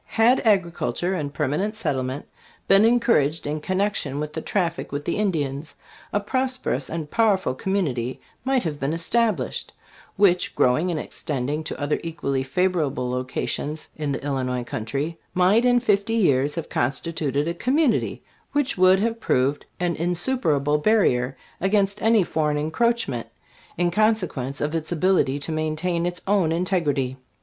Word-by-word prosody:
Had 240 +3 +5
agriculture 185 -3 +1
and 150 -6 -3
permanent 150 +9 -1
settlement 135 - -2 0.4
been 195 +2 +6
encouraged 225 - +2
in 150 +1 -2
connection 185 -5 -1
with 150 0 -4
the 160 - -3
traffic 170 -3 -1
with 145 +1 -4
the 170 - -1
Indians, 155 -8 -2 0.4
a 205 - +1
prosperous 255 - -1
and 160 -2 -5
powerful 205 - +2
community 130 -8 -2 0.2
might 260 -1 +1
have 150 -4 -3
been 140 +3 -1
established, 180 - 0 0.4
which, 185 -3 +3
growing 150 +8 +3
and 165 -3 -1
extending 145 +1 -3
to - - -5
other 145 0 0
equally 140 -5 -2
favor 180 +6 +1
able 125 -3 -2
localities 130 +4 -3
in 150 -2 -2
the 135 - -4
Illinois 130 -3 -1
country, 140 +8 -4 0.2
might 190 +6 +4
in 245 0 +5
fifty 215 -1 +1
years 145 - +2
have 165 - -4
constituted 145 +2 -1
a 170 - 0
community 260 - +1 0.3
which 285 -8 0
would 185 +1 +6
have 230 +2 -1
proved 135 - 0
an 175 -1 0
insuperable 165 - +1
barrier 135 - +2 0.2
against 200 +1 +1
any 225 -2 +4
foreign 150 -3 0
encroachment, 160 - 0 0.5
in 175 0 +1
consequence 180 - 0
of 150 +1 -1
its 160 0 -2
ability 175 -5 +2
to 145 +3 -5
maintain 155 +2 -1
its 175 0 -4
own 195 -5 +2
in 170 +2 0
tegrity. 145 -9 0
165 Hz, 150 wpm, -24 LUFS, 145-200 Hz, 0.5 s, been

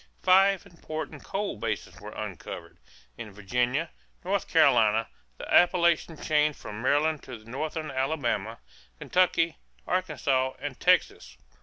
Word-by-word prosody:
Five 195 +1 +4
important 160 -4 -7
coal 200 - -3
basins 105 -3 -4
were 105 - -8
uncovered: 105 -4 -8 0.4
in 110 -2 -7
Virginia, 125 - -1 0.3
North 195 +1 -1
Carolina, 115 -8 +4 0.3
the - - -8
Appalachian 170 -2 +4
chain 150 0 +2
from 105 -5 -8
Maryland 145 +4 +2
to 125 -3 -9
Northern 155 +4 -4
Alabama, 130 -6 -1 0.4
Kentucky, 170 - +1 0.3
Arkansas, 135 -8 0
and 140 -1 -6
Texas. 60 +1 +1
145 Hz, 115 wpm, -27 LUFS, 115-165 Hz, 0.4 s, Five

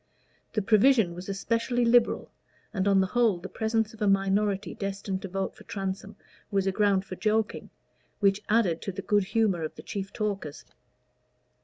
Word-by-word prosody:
The 215 - 0
provision 215 -2 +4
was 180 +3 -8
especially 230 +5 0
liberal, 235 0 +3 0.4
and 195 -2 0
on 195 -1 +5
the - - +2
whole 235 -6 +3
the 170 - -7
presence 220 -1 -1
of 225 - -15
a 210 - +2
minority 195 0 +1
destined 195 -1 -4
to - - -5
vote 195 +1 -3
for - - -15
Transome 195 +1 -5 0.3
was 195 -1 +1
a 195 - +2
ground 200 -1 +2
for 185 - -7
joking, 215 +2 -1 0.5
which 200 -1 +3
added 205 -7 +2
to 195 - -3
the 195 +1 -7
good 205 -2 +2
humor 210 -5 +1
of 155 - -4
the - - -10
chief 195 -1 -5
talkers. 200 -8 -4
200 Hz, 175 wpm, -27 LUFS, 190-220 Hz, 0.5 s, on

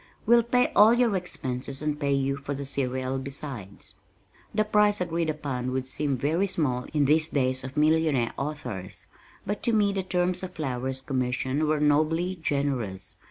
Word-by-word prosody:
We'll 235 +1 +6
pay 245 +2 +2
all 215 +3 +7
your 240 -4 +2
expenses 135 -7 -4
and 150 -1 -1
pay 140 -1 +1
you 135 0 +1
for 140 +1 -5
the 140 +1 -5
serial 130 -1 -2
besides." 135 -7 -5 0.5
The 215 - +2
price 210 -1 +3
agreed 170 -2 -1
upon 135 -5 -3
would 130 0 -2
seem 140 0 -1
very 160 +9 +1
small 145 -10 0
in 150 -2 +2
these 155 +3 +3
days 130 -2 0
of 130 +3 -7
millionaire 155 -5 +2
authors, 125 -11 -5 0.4
but 205 +1 -3
to 235 - +1
me 205 -2 +3
the 195 - 0
terms 180 -1 0
of 185 -1 -7
Flower's 130 -3 -3
commission 130 +3 -1
were 155 0 +2
nobly 155 +5 +2
generous. 130 -11 -2
145 Hz, 165 wpm, -27 LUFS, 130-175 Hz, 0.5 s, all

